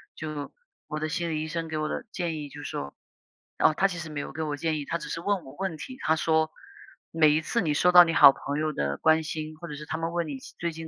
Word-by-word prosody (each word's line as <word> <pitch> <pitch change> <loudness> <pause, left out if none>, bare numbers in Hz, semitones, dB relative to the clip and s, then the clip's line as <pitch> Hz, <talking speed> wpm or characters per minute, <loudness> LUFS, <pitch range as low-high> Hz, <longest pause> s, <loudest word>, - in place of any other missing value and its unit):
就 155 -2 -6 0.3
我 155 - -4
的 155 0 -2
心 170 +1 -2
理 155 -1 -1
医 - - -4
生 165 +1 -3
给 160 -1 -3
我 155 0 -1
的 - - -4
建 170 -4 -2
议 145 -1 -6
就 145 +1 -10
说 70 - -5 0.6
哦， - - +5
他 195 - +3
其 180 -3 -6
实 170 -2 -6
没 150 -1 -5
有 - - -7
给 160 - -5
我 150 -2 -2
建 155 +1 -1
议， 145 - -5
他 170 - -2
只 - - -8
是 165 - -4
问 200 -1 0
我 135 +1 -12
问 190 -3 -2
题。 255 - -8
他 160 - +2
说 160 0 +2 0.6
每 160 -2 +5
一 155 +2 +2
次 235 +8 0
你 155 -5 +1
收 180 +4 +4
到 180 0 +10
你 165 - -1
好 140 - +9
朋 140 +1 -4
友 155 0 0
的 70 - -1
关 160 0 +4
心， 155 0 -5
或 170 +2 -8
者 150 - -6
是 150 +1 -8
他 155 - -3
们 165 +1 -2
问 170 -1 -1
你 140 -3 -5 0.2
最 170 0 -1
近 160 0 -8
160 Hz, 305 characters per minute, -27 LUFS, 150-170 Hz, 0.6 s, 到